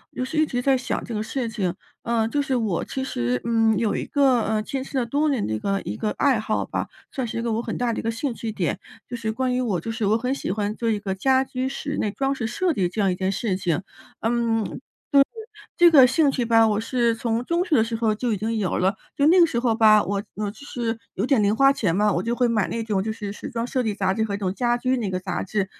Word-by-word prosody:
就 255 - -2
是 305 +4 -5
一 310 - +4
直 245 0 -2
在 270 -1 +4
想 255 - -2
这 235 - -6
个 210 - -1
事 240 +2 -3
情， 195 -6 -2 0.3
嗯， 230 -1 +1
就 290 +2 0
是 270 -2 -1
我 215 -8 0
其 265 - -4
实， 120 - -1
嗯， 225 -2 +3
有 225 -1 0
一 - - -2
个， 265 -5 +3
呃， 215 -1 0
坚 265 +2 -4
持 270 - -5
了 245 - +1
多 290 +5 +1
年 255 -7 0
的 110 - -2
一 110 - -2
个 195 0 -1
一 105 - -4
个 210 - -2
爱 270 -6 +3
好 215 0 -1
吧， - - -3 0.2
算 260 -4 -3
是 225 - -5
一 - - -1
个 230 -2 -1
我 225 - 0
很 - - -4
大 240 -2 0
的 - - -3
一 - - -2
个 225 - -2
兴 240 +3 -2
趣 225 -1 -5
点。 190 -5 -2 0.3
就 245 - -5
是 225 -2 -2
关 250 +2 -1
于 255 - 0
我 205 -8 0
就 225 +8 -5
是 225 -2 -2
我 215 - +3
很 250 +3 -1
喜 275 - -4
欢 205 +2 -1
做 230 -1 -1
一 215 - 0
个 200 -2 -3
家 260 +7 +2
居 260 0 -3
室 285 +1 -4
内 210 - 0
装 270 +6 -1
饰 240 -5 -3
设 335 +8 0
计 180 -6 0
这 215 - -6
样 195 -2 +3
一 - - -1
件 190 +1 -1
事 200 -1 -1
情。 180 -1 -1 0.4
嗯， 230 -1 +1 0.5
就 280 - +6
是 275 - +7 0.5
这 345 -1 +7
个 270 -5 +9
兴 280 +2 +3
趣 250 - -1
吧， 225 -1 +5
我 210 -1 +1
是 235 0 +1
从 230 0 -1
中 340 +1 +1
学 330 - +1
的 225 - +5
时 225 0 -3
候 220 -2 +1
就 235 +1 -1
已 205 - -1
经 225 +3 -2
有 195 -4 -1
了。 190 +3 +1 0.2
就 285 - +2
那 360 +3 +6
个 340 - +8
时 235 -7 -1
候 235 -2 +1
吧， 215 -2 +6
我 200 +1 -2
我 210 -1 -2
就 225 +7 -14
是 235 -4 -3 0.2
有 200 - -1
点 265 -7 +3
零 205 +2 +2
花 275 +3 +5
钱 185 -11 0
嘛， 210 +1 +3
我 175 - -1
就 235 +1 -1
会 245 0 +2
买 225 -3 +1
那 230 - -2
种 205 -4 -1
就 220 - -2
是 205 -2 -6
时 - - -7
装 230 0 -2
设 255 0 -1
计 220 -3 -1
杂 190 -1 0
志 220 - +1
和 215 -2 -2
那 - - -1
种 190 -2 -1
家 240 +2 +1
居 255 +1 0
那 220 -5 -2
个 185 - -1
杂 180 -1 -3
志， 200 0 -1
225 Hz, 315 characters per minute, -24 LUFS, 210-255 Hz, 0.5 s, 个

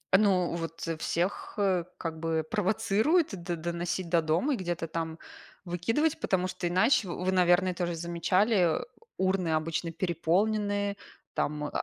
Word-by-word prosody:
ну, 190 -4 +3
вот, 165 -1 -5 0.2
всех, 175 +4 -2
э, 185 -4 +2
как 160 -2 -5
бы, 160 -1 -1
провоцируют 215 - +2
д 175 -2 -4
доносить 170 +1 -3
до 170 -1 +3
дома 165 - +1
и - - -1
где-то 175 -3 -3
там 160 0 -4 0.5
выкидывать, 225 - 0
потому 185 -1 +1
что 180 -1 -3
иначе, 190 +4 +3
вы 180 +2 -1
наверное 180 0 +4
тоже 175 -1 -2
замечали, 175 +2 +2
э, - - -7 0.3
урны 190 -2 +1
обычно 165 +1 -2
переполнены, 200 +4 0 0.4
там, 150 0 -1
о 150 - -2
180 Hz, 140 wpm, -29 LUFS, 170-195 Hz, 0.5 s, наверное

